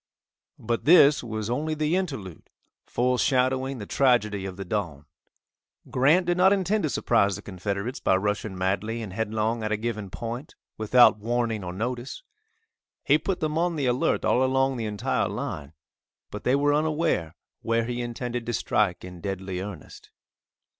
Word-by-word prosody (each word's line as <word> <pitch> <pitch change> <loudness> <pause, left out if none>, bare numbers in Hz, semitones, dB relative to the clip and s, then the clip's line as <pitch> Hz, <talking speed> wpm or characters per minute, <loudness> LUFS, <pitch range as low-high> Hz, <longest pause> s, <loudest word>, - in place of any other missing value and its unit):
But 115 +1 -3
this 150 -4 +6
was 110 -2 -4
only 150 +6 -1
the 155 +2 0
interlude 135 - -4 0.4
foreshadowing 130 +1 +1
the 105 - -6
tragedy 105 -7 +2
of 95 -1 -8
the 95 - -6
dawn. 85 -7 -3 0.9
Grant 150 +8 +4
did 175 +1 +1
not 185 +2 +5
intend 200 +2 +1
to 155 - 0
surprise 100 -7 +2
the 105 - -9
Confederates 100 +6 -4
by - - +2
rushing 105 0 -2
madly 100 +5 -1
and 95 -4 -7
headlong 110 +1 -1
at 110 0 -2
a 110 - +1
given 105 -3 -4
point, 120 - -6 0.2
without 110 +1 +5
warning 115 -1 -1
or 90 - -4
notice. 120 - -4 0.8
He 150 +1 +4
put 180 +3 -3
them 155 0 0
on 175 0 +1
the 145 -3 -1
alert 125 0 +1
all 125 - +3
along 135 0 +1
the 115 - -3
entire 105 -2 -1
line, 75 0 -5 0.6
but - - -7
they 125 - +4
were 145 +1 +2
unaware 150 - 0 0.3
where 115 0 0
he 120 +1 -3
intended 120 0 -4
to 120 - -1
strike 105 -5 0
in 90 -2 -10
deadly 95 -1 -4
earnest. 95 -6 -9
115 Hz, 160 wpm, -26 LUFS, 100-135 Hz, 0.9 s, this